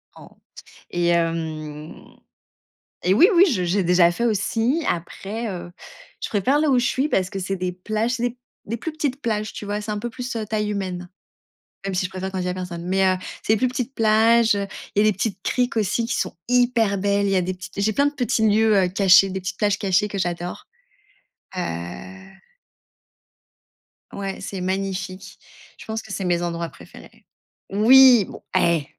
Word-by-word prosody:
En - - -14 0.4
s - - -19 0.2
et 175 0 0
hem, 160 -3 -2 1.0
et 185 +2 +3
oui, 350 - +7
oui, 365 +3 +7
je 185 -6 0
j'ai 185 +2 +1
déjà 175 0 +4
fait 235 +7 -2
aussi. 230 - 0
Après, 200 +6 -3
heu, 175 -2 -7 0.5
je - - -3
préfère 255 +8 +2
là 310 -1 +2
où 260 - +4
je 245 - 0
suis, 280 +4 0
parce 190 -6 +1
que 195 - -4
c'est 195 +1 -2
des 180 0 -2
plages, 215 +6 -2
c'est 245 0 -2 0.3
des 230 +3 -3
plus 320 - -5
petites 290 -4 -2
plages, 215 -4 -2
tu 205 - -7
vois? 205 +1 -3
C'est 210 - -8
un 210 - -2
peu 240 - -4
plus, 250 0 -6
heu, 220 - -2
taille 210 0 -2
humaine. 185 -3 -4 0.8
Même 195 - -2
si 185 - 0
je - - -4
préfère 190 +1 -5
quand 190 - -3
il 180 - -2
y - - -2
a - - 0
q - - -5
personne, 175 -2 -6
mais 190 +1 +2
heu, 185 0 +3 0.3
c'est 220 - +2
plus 255 +4 +2
petite 250 +1 -4
plage, 225 +1 +4
heu, 200 0 -1 0.3
et 205 - +4
les 215 -1 +4
petites 195 0 -3
criques 245 -2 0
aussi, 220 +2 0
qui 235 - -1
sont - - -2
hyper 240 -5 +2
belles. 200 +1 +1
Il 195 - 0
y - - +2
a 185 - +3
des 185 +1 -2
petites 185 +2 -9
j'ai 215 +2 +1
plein 280 +6 +3
de 290 - -3
petits 225 -3 +1
lieux, 215 +1 +3
heu, 190 -2 +3
cachés, 190 +1 +5
des 190 - -3
petites 185 +1 -5
plages 205 -1 +1
cachées 195 +1 +2
que 200 - -5
j'adore, 175 -1 -3 0.9
heu - - 0 2.5
Ouais, 195 -1 -5
c'est 195 -1 -5
magnifique. 190 0 -4 0.4
Je - - -12
pense 220 0 -4
que 215 - -12
c'est 195 - -3
mes 175 -1 +1
endroits 170 -1 -3
préférés. - - -16 0.5
Oui! 240 +1 +7
Bon - - -11 0.2
eh! 165 -4 +2
200 Hz, 200 wpm, -22 LUFS, 185-225 Hz, 2.5 s, oui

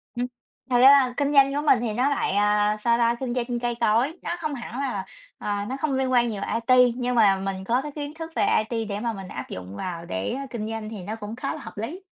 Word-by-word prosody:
Ừm. 245 +1 -1 0.4
Thật 245 - +3
ra 265 +3 +9
là 265 -3 +5
kinh 285 0 +1
doanh 275 -1 +6
của 290 - 0
mình 265 - +5
thì 230 -2 -2
nó 250 +5 +2
lại, 280 - 0
à, 210 +1 +2
sao 235 +2 +2
ta? 235 0 +2
Kinh 255 -2 -2
doanh 240 -1 -2
cây 240 0 -1
cối, 240 +10 +2
nó - - -3
không 310 -3 -3
hẳn 240 0 -6
là, 245 -9 -2 0.3
ờ, 205 -1 -2
nó 265 - -3
không 290 0 -1
liên 265 -1 0
quan 240 -1 +3
nhiều 205 -3 -4
IT, 250 +2 +4
nhưng 250 0 -1
mà 210 -4 +5
mình 190 0 -4
có 235 +6 +1
cái 295 +1 -6
kiến 290 0 -6
thức 325 +1 -7
về - - +2 0.3
IT 225 -2 -2
để 200 0 -3
mà 230 +1 -2
mình 195 -3 -8
áp 130 - -7
dụng 95 +1 -7
vào 170 - -5
để, 95 - -3
a, 275 +1 -4
kinh 220 -4 -4
doanh 220 -1 -5
thì 210 -4 -7
nó 215 +4 -4
cũng 215 0 -7
khá 275 +5 -3
là 310 - -9
hợp - - -10
lý. 255 - -5
240 Hz, 270 wpm, -25 LUFS, 210-265 Hz, 0.4 s, ra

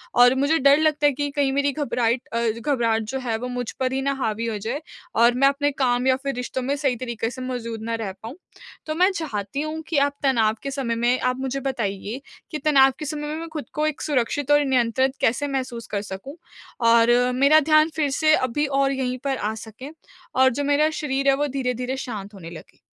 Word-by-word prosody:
और 245 +1 +6
मुझे 285 +4 +2
डर 280 +2 +6
लगता 300 -2 +2
है - - +4
कि 290 +2 -2
कहीं 280 -2 +1
मेरी 280 0 +1
घबराइट 250 -4 -1
अ, 230 - 0 0.2
घबराहट 230 -4 +1
जो 265 +5 -4
है, 230 -3 -2
वो 250 +2 -5
मुझ 245 -2 -4
पर 255 0 0
ही 270 - -1
ना 275 +1 0
हावी 220 +1 -1
हो 215 -2 -2
जाए 235 +9 -4 0.3
और 235 +1 +5
मैं 275 +2 +4
अपने 285 +1 +1
काम 255 -2 0
या 260 - +5
फिर 275 -1 -1
रिश्तों 250 +1 -4
में 275 +3 -1
सही 275 -4 0
तरीके 235 -2 -3
से 255 0 -8
मौजूद 230 -3 -5
ना 230 0 -2
रह 215 -4 -4
पाऊँ। 235 +6 -7 0.5
तो 310 0 -3
मैं 365 +3 +4
चाहती 275 - -4
हूँ 310 +1 -4
कि 315 - -1
आप 285 - -2
तनाव 225 -5 +2
के 275 - -3
समय 255 -4 -2
में 240 +2 +1
आप 255 0 0
मुझे 265 +1 -2
बताइए 225 -1 -3 0.3
कि 305 - -2
तनाव 270 -3 +6
के 305 - -4
समय 295 0 -4
में 305 - -3
मैं 330 - -6
खुद 305 - -4
को 305 0 0
एक 305 - -3
सुरक्षित 285 0 -1
और 290 0 +5
नियंत्रित 260 +1 +1
कैसे 250 +6 +1
महसूस 255 -4 -4
कर 200 - 0
सकूँ 200 - -8 0.5
और 230 +1 +5 0.2
मेरा 280 +4 +6
ध्यान 310 +1 +6
फिर 300 -3 +1
से 310 -1 +4
अभी 260 +4 0 0.2
और 275 0 +2
यहीं 255 -1 -2
पर 270 -1 0
आ 215 +1 -2
सके 245 +6 -10 0.5
और 260 0 +5
जो 285 - -2
मेरा 290 +2 +3
शरीर 275 -2 -2
है, - - +5
वो 290 +1 0
धीरे-धीरे 250 -1 -2
शांत 210 -5 -6
होने 170 -4 -10
लगे। 165 - -12
265 Hz, 225 wpm, -23 LUFS, 235-285 Hz, 0.5 s, और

